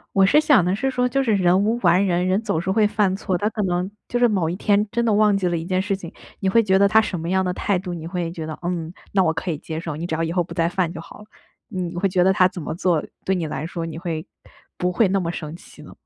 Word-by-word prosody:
我 195 - +5
是 300 +10 +5
想 290 - +4
的 180 +2 +1
是 270 +6 -1
说 250 -1 +1
就 275 +3 +1
是 225 -5 +1
人 185 +1 +3
无 225 +3 +1
完 180 +2 +4
人， 180 -1 +1
人 190 +4 +1
总 200 -8 -1
是 185 +2 -2
会 210 +2 +3
犯 205 -3 +1
错。 195 -2 -2
他 205 - 0
可 220 -2 -3
能 180 0 -1 0.2
就 240 - -1
是 245 - +5
某 190 -7 +1
一 170 - -3
天 205 +1 +2
真 235 - 0
的 225 - +2
忘 210 -1 +4
记 190 -2 -1
了 175 - 0
一 165 - -4
件 185 +1 0
事 195 +1 -1
情， 170 -3 -10 0.3
你 195 - 0
会 230 +4 +4
觉 190 -3 +3
得 200 0 +5
他 220 +1 +5
什 185 -6 -3
么 165 - -4
样 190 0 +1
的 180 - -1
态 190 0 0
度， 180 -1 -6
你 160 -1 -7
会 170 -1 -3
觉 160 -2 -6
得， 155 - -6
嗯， 170 -2 -3 0.2
那 195 - +4
我 160 -3 +2
可 160 +3 -3
以 155 - -3
接 160 0 -6
受， 165 -2 -5
你 170 - -4
只 160 - -2
要 165 - -1
以 165 - -2
后 180 - +2
不 170 0 -9
再 170 -1 +1
犯 175 -2 -1
就 165 - -7
好 - - -13
了？ 210 - -12 0.4
你 185 -6 -4
会 195 +2 +1
觉 180 -1 +2
得 190 - +5
他 185 -2 +4
怎 185 -1 -8
么 150 - -4
做， 175 -3 +1 0.2
对 190 - +1
你 170 -3 -2
来 150 +1 -4
说 170 -1 -5
你 165 -1 -6
会 165 -1 -4 0.5
不 180 0 0
会 200 +2 +3
那 195 0 +1
么 170 - -2
生 155 -2 -6
气 - - -16
呢？ - - -12
185 Hz, 335 characters per minute, -22 LUFS, 170-200 Hz, 0.5 s, 我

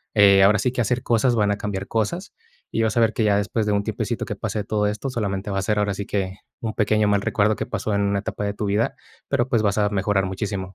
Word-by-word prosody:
eh, 100 -2 +7
ahora 105 +2 +5
sí 125 - +1
que 125 - -1
hacer 120 +2 0
cosas 120 +1 +2
van 105 -2 +2
a 100 - -1
cambiar 100 -1 -4
cosas, 115 - -2 0.4
y - - +2
vas 110 +1 0
a - - +5
ver 115 -1 +3
que 110 - 0
ya 105 -1 +3
después 105 +2 -1
de - - +2
un 100 0 +1
tiempecito - - -3
que - - -4
pase 105 - -3
todo 105 0 0
esto, 105 +6 -3
solamente 100 -4 -2
va 95 - 0
a - - -1
ser 105 +2 0
ahora 100 -1 +1
sí 100 +1 -5
que 95 -1 -2 0.2
un 110 -2 -3
pequeño 110 -1 +2
mal 100 -1 +2
recuerdo 105 +2 +1
que - - -3
pasó 110 -1 -2
en 100 - +1
una 100 0 +1
etapa 100 - -4
de 100 - -1
tu 105 - -3
vida, 105 +3 0 0.3
pero, 120 - +1
pues, 115 -5 +2
vas 100 -1 +1
a 105 -1 +2
mejorar 100 -1 +1
muchísimo. 95 0 -4
105 Hz, 275 wpm, -23 LUFS, 100-110 Hz, 0.4 s, eh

